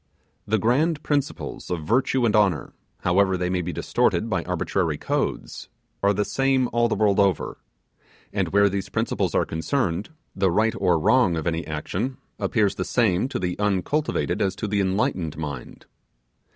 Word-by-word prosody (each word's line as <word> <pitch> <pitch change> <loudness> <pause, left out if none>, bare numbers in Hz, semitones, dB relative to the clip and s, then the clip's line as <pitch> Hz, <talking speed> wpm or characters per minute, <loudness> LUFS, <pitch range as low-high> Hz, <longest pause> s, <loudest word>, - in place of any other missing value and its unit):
The 110 - +2
grand 145 - +1
principles 145 -2 -2
of 85 -4 -3
virtue 130 - +2
and 110 -1 +2
honour, 100 -7 +2 0.3
however 95 +1 +2
they 90 0 -1
may 90 -1 0
be 90 +1 -3
distorted 115 +5 0
by 90 -4 0
arbitrary 90 -2 -1
codes, - - -3 0.3
are 100 - +4
the 105 +1 0
same 135 -1 +1
all 120 0 +3
the - - 0
world 105 -2 +2
over: 100 -5 +1 0.7
and - - 0
where 100 +1 +4
these 100 -1 -3
principles - - -1
are - - +3
concerned, 90 - -1 0.3
the 95 -1 +2
right 110 +6 +2
or 90 -6 +2
wrong 90 +2 +3
of 80 -2 -3
any 85 -1 -1
action 95 - -3 0.2
appears 105 -4 +1
the 95 - -3
same 105 0 +1
to - - -3
the 90 -1 -2
uncultivated 105 - 0
as 95 -1 +1
to 105 - -4
the 100 0 +1
enlightened 95 -4 -1
mind. 70 -5 -7
100 Hz, 165 wpm, -24 LUFS, 90-115 Hz, 0.7 s, are